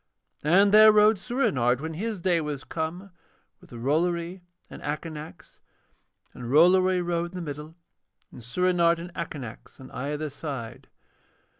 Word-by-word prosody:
And 195 +7 +4
there 215 +1 +8
rode 210 -1 +4
Soorenard, 135 - 0
when 160 +2 -5
his 205 +1 -4
day 175 -3 +2
was 150 -3 -5
come, 175 +4 -5 0.5
with - - -19
Rollory 170 +8 -1 0.3
and - - -11
Akanax, 155 +2 -7 0.7
and 120 -1 -8
Rollory 180 +5 +4
rode 170 0 -2
in - - -10
the 180 - -4
middle 150 +1 -7 0.6
and - - -12
Soorenard 170 +6 +2
and 175 +1 -9
Akanax 145 -10 -8
on 130 - -12
either 150 +3 -4
side. 135 -6 -7
165 Hz, 135 wpm, -26 LUFS, 145-185 Hz, 0.7 s, there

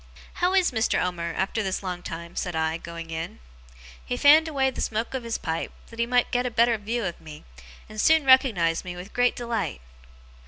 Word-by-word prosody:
'How 360 +2 +3
is 370 -5 +3
Mr. 225 -2 +1
Omer, 170 -2 -2
after 195 +4 0
this 195 -1 -2
long 180 -2 -4
time?' 170 0 -7
said 180 -3 -3
I, 160 0 0
going 170 -1 -8
in. 165 +1 -5 0.7
He 245 - -3
fanned 300 +4 +6
away 270 -4 +1
the - - -6
smoke 225 +3 -2
of 265 - -2
his 230 -1 -3
pipe, 160 0 -3 0.2
that 230 - -12
he 235 - +1
might 245 0 +2
get 245 0 +1
a - - -1
better 235 0 +3
view 225 +2 -2
of 175 -2 -5
me, 155 -2 -11 0.4
and 215 0 -4
soon 320 -2 +4
recognized 220 -11 +4
me 180 -1 -6
with 180 +3 -10
great 245 0 +2
delight. 230 -8 -3
215 Hz, 205 wpm, -25 LUFS, 170-245 Hz, 0.7 s, fanned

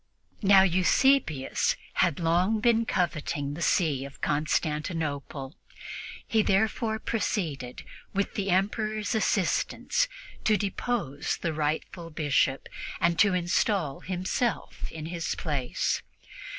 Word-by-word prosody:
Now, 195 -2 +7
Eusebius 185 - +3 0.3
had 170 -5 +2
long 180 +6 +2
been 230 0 +3
coveting 155 -4 -1
the 165 - -6
see 155 -7 +2
of 140 0 -10
Constantinople; 150 -2 -1 0.7
he 220 - +3
therefore 220 +2 +1
proceeded, 160 - -2 0.3
with 200 0 -1
the 200 -1 -2
Emperor's 215 +3 0
assistance, 220 - +1 0.4
to 215 -1 +4
depose 200 - -2
the 170 - -2
rightful 155 +3 -2
Bishop 145 -3 +1 0.3
and 170 -2 +2
to 200 -3 +5
install 175 -3 +1
himself 190 +6 -2
in 160 -1 -6
his 170 0 -3
place. 150 +2 -1
175 Hz, 105 wpm, -28 LUFS, 150-205 Hz, 0.7 s, Now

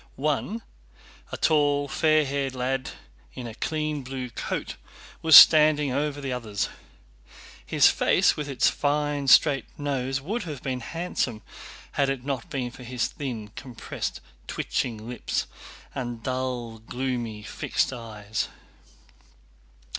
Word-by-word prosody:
One, 155 - -1 0.7
a - - -4
tall, 145 -2 +2
fair 155 +1 +3
haired 135 -1 -2
lad 130 +1 -1 0.5
in 125 - -6
a 115 - -6
clean 150 +3 -2
blue 130 -1 -6
coat, - - -4 0.5
was 160 -2 +7
standing 150 -3 +9
over 145 +2 -1
the 135 -2 -3
others. 110 -5 -2 0.9
His - - +3
face - - +4
with 150 -1 -4
its 135 -3 +2
fine 145 -1 0
straight 140 0 +6
nose 135 -2 -1
would 205 - -3
have 150 -8 -7
been 130 -2 -2
handsome 130 - -3 0.5
had 140 -1 +1
it 135 -2 -3
not 135 -4 -3
been 125 -3 -3
for 125 - -13
his 125 -1 -2
thin, 120 -7 -5
compressed, 125 +2 -6 0.3
twitching 110 -3 -2
lips 125 0 -2 0.5
and 120 -3 -5
dull, 125 -3 -3
gloomy, 120 -2 -4
fixed 130 - -1
eyes. 110 -3 -4
135 Hz, 125 wpm, -26 LUFS, 120-145 Hz, 0.9 s, standing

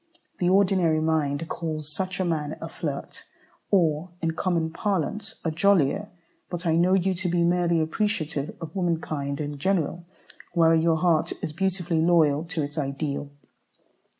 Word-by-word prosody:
The 175 - +2
ordinary 185 -4 +3
mind 155 -1 0
calls 155 -3 -4
such 180 +5 -3
a 185 - +1
man 155 -3 -2
a - - -5
flirt, - - -5 0.5
or, 165 -3 +2
in 165 -1 0
common 165 -1 0
parlance, 205 +3 -2
"a 165 - +1
jollier;" 195 +2 +2 0.4
but 175 0 -5
I 160 -1 +3
know 180 +3 +4
you 190 0 +2
to 180 0 -2
be 170 0 +2
merely 170 -1 +2
appreciative 160 -3 -1
of 165 +2 -8
womankind 155 -6 -1
in 145 -1 -4
general, 170 0 0 0.5
while 165 -1 +5
your 165 0 +3
heart 165 -2 +2
is 155 - -3
beautifully 175 -2 0
loyal 160 -3 +3
to 165 -2 -2
its 145 +2 -4
ideal. 140 0 -3
165 Hz, 150 wpm, -26 LUFS, 155-180 Hz, 0.5 s, while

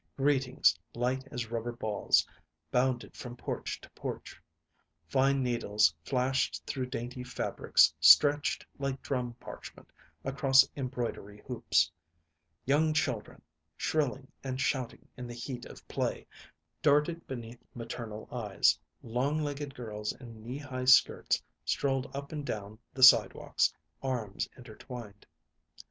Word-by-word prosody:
Greetings, 135 - +3 0.2
light 130 +2 -1
as 115 -2 -5
rubber 120 +1 -2
balls, 110 -3 +2 0.5
bounded 125 -1 0
from 120 -1 -8
porch - - -4
to - - -14
porch. - - -7 0.7
Fine 135 +5 +2
needles 105 -8 +2
flashed 130 +2 0
through 130 -2 -3
dainty 125 +1 -5
fabrics 125 0 +3
stretched 145 0 +6
like 135 -1 -3
drum 125 -3 -2
parchment - - -11 0.3
across 135 0 +5
embroidery 120 -6 -4
hoops; 85 -10 +2 0.7
young 155 +3 +3
children, 130 -8 -2 0.3
shrilling 135 -3 -1
and 130 -1 -3
shouting 130 -2 -2
in 125 -1 -6
the 120 - -7
heat 120 0 -6
of - - -13
play, - - -2 0.6
darted 150 +3 +2
beneath 120 -2 -7
maternal 115 -2 -6
eyes; 110 -5 +2 0.2
long 125 +6 0
legged 145 -1 -4
girls 105 -3 -4
in 115 -4 -12
knee 120 +5 -5
high 130 -3 -5
skirts 125 0 +5 0.2
strolled 135 -1 0
up 140 0 -6
and 150 -2 -4
down 105 -4 -5
the 130 - -1
sidewalks, 115 -5 +6 0.3
arms 120 -7 -2
intertwined. 115 -3 -10
125 Hz, 120 wpm, -31 LUFS, 115-135 Hz, 0.7 s, stretched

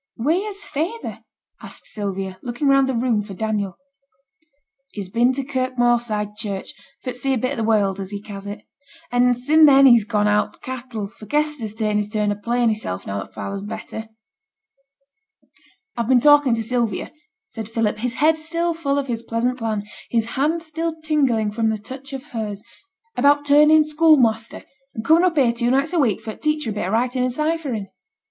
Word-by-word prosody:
'Wheere's 385 - -1
feyther?' 340 +11 -4 0.4
said - - -9
Sylvia, 195 -2 -4
looking 245 +4 -2
round 275 -1 +4
the 260 - 0
room 230 -2 +1
for 200 -2 -9
Daniel. 205 -2 -2 1.2
'He's 195 -3 -6
been 240 +4 +3
to 275 +1 -3
Kirk 255 -1 -2
Moorside 235 -4 +1
Church, 210 +3 -5 0.3
for 255 - -3
t' 245 - -9
see 270 +1 +1
a - - 0
bit 255 +3 -1
o' 245 - -3
th' 220 - -1
world, 200 -3 +2
as 190 -1 -5
he 205 0 -5
ca's 200 -1 -9
it. 205 +1 -6 0.5
And 245 0 +3
sin' 305 +5 +5
then 275 -1 +7
he's 235 -4 +7
gone 210 -1 +1
out 210 0 +1
to - - -23
th' - - -36
cattle; 245 -5 -5
for 215 0 -14
Kester's 295 -6 -1
ta'en 215 -2 0
his 210 0 -1
turn 210 -1 0
of 205 0 -5
playing 240 +1 +1
hissel', 210 - -2
now 100 0 -3
that - - -10
father's 195 0 -4
better.' 220 +2 -7 1.9
'I've 235 -2 -2
been 255 -1 +6
talking 290 -2 +5
to 225 - -2
Sylvia,' 230 -4 -1 0.4
said 220 -2 -7
Philip, 225 -2 -1
his 245 +2 -2
head 315 +2 +3
still 335 +2 -1
full 285 -4 -1
of 280 - 0
his 235 -3 -3
pleasant 240 +2 -1
plan, 215 -3 -2 0.2
his 230 -1 0
hand 315 +5 0
still 325 0 -4
tingling 265 -9 +1
from 225 +1 0
the 220 - -1
touch 260 +6 -10
of 270 -1 -6
hers, 210 -3 -4 0.5
'about 290 +3 +3
turning 300 +2 +6
schoolmaster, 295 -8 +2 0.3
and 220 - -5
coming 330 +2 +5
up 345 -3 +1
here 255 -4 +4
two 235 0 -1
nights 275 +6 +1
a 345 - +2
week 235 -9 +1
for 220 - -6
t' - - -18
teach 300 -2 -6
her 225 - -2
a - - -3
bit 200 -3 -3
o' - - -2
writing 250 +4 0
and 255 - 0
ciphering.' 300 -8 -2
240 Hz, 200 wpm, -21 LUFS, 215-285 Hz, 1.9 s, then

